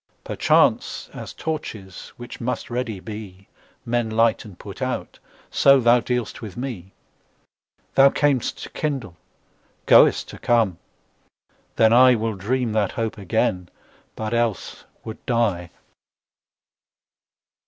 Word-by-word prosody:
Perchance, - - +1
as - - -8
torches, 110 - -6
which 120 0 -9
must 125 +1 -3
ready 120 -4 -3
be, 100 -2 -9 0.4
Men 120 -1 0
light 115 +1 +2
and 100 -5 -12
put - - -10
out, - - -4 0.3
so 140 -1 +5
thou 120 0 +5
dealst 125 -2 -3
with 105 -5 -8
me. 115 -8 -6 1.0
Thou 135 0 +7
cam'st 140 -4 0
to - - -7
kindle, 135 - -3 0.7
goest - - +5
to - - -10
come: 110 -7 +1 1.0
then 110 -1 +4
IWill 115 -4 +4
dream 120 +4 -1
that 105 -3 0
hope 115 -1 -3
again, 95 -2 -1 0.5
but 110 +1 -4
else 115 -4 -2 0.2
would 110 - -9
die. 105 -8 0
115 Hz, 115 wpm, -22 LUFS, 105-125 Hz, 1.0 s, Thou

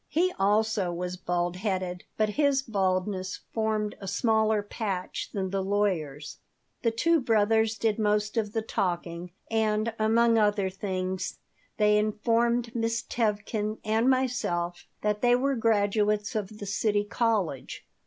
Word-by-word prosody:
He 360 +3 +1
also 205 -1 +2
was 180 +1 -3
bald 175 0 -2
headed, 185 -3 -2
but 215 -1 +2
his 275 +3 +2
baldness 190 -3 -1
formed 215 -1 0
a 195 - -6
smaller 220 0 +2
patch 200 -3 -4
than 190 -2 -3
the 195 0 0
lawyer's 185 -8 -1 0.4
The 230 - +2
two 330 +9 +2
brothers 220 -1 +2
did 220 -1 0
most 210 0 +1
of 215 -2 -1
the 225 - -1
talking, 175 -4 -2 0.2
and, 220 0 +1
among 230 +1 +4
other 205 -2 +2
things, 185 -1 -3 0.4
they 210 -1 +4
informed 230 +2 +1
Miss 230 0 -1
Tevkin 215 -1 -1
and 220 +3 +2
myself 235 -10 0 0.2
that 210 0 0
they 245 0 +5
were 275 +3 +1
graduates 210 -1 +1
of 210 -1 -4
the 205 - -7
City 205 +1 +1
College. 205 - -1
210 Hz, 135 wpm, -28 LUFS, 190-225 Hz, 0.4 s, they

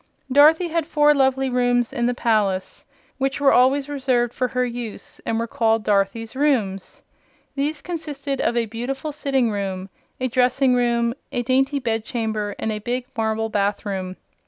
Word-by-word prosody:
Dorothy 315 +6 +5
had 330 -1 -1
four 295 -2 +4
lovely 265 -1 +2
rooms 245 -1 +1
in 240 -3 0
the 245 - 0
palace, 205 -6 0 0.3
which 270 +1 -1
were 280 -1 +4
always 270 +3 +4
reserved 255 -4 0
for 255 - 0
her 250 0 0
use 240 -2 -7
and 225 - 0
were 230 - -1
called 225 -1 +1
"Dorothy's 210 +3 0
rooms." 230 -10 -1 0.5
These 285 +1 -2
consisted 295 -5 -4
of 235 - 0
a 235 - +2
beautiful 250 +7 -4
sitting 270 -5 0
room, 195 -2 -4 0.3
a 255 - 0
dressing 255 +1 +2
room, 235 -1 +1 0.2
a 245 - -1
dainty 270 +3 +2
bedchamber 220 -3 -2
and 220 - -2
a 210 - -3
big 245 +3 -3
marble 225 0 -1
bathroom. 200 -2 -2
245 Hz, 160 wpm, -22 LUFS, 220-270 Hz, 0.5 s, Dorothy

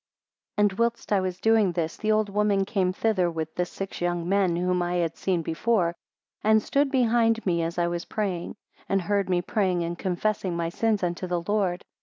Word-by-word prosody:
9 210 - +4
And 200 - +1
whilst 235 -2 0
I 200 - +4
was 185 -1 -3
doing 220 -5 +3
this, 165 -2 -2
the 215 - -1
old 215 0 +2
woman 200 -1 +1
came 190 -3 0
thither 185 -3 +1
with 160 -1 -4
the 180 0 -1
six 195 0 -6
young 175 -1 -1
men 190 -2 +2
whom 180 +1 0
I 175 0 -1
had 170 -2 0
seen 180 -3 -1
before, 170 +1 +1 0.5
and 220 +1 +5
stood 280 +6 +1
behind 230 -3 +2
me 170 -3 +1
as 165 +1 -3
I 175 - +2
was 170 0 -3
praying, 190 -5 -3 0.3
and 195 -1 +1
heard 200 +1 0
me 175 -1 +1
praying 185 -3 0
and 170 +1 -3
confessing 185 +1 -1
my 165 -1 -1
sins 215 +2 0
unto 175 +1 -2
the 175 -1 -1
Lord. 195 -3 0
185 Hz, 205 wpm, -26 LUFS, 175-210 Hz, 0.5 s, and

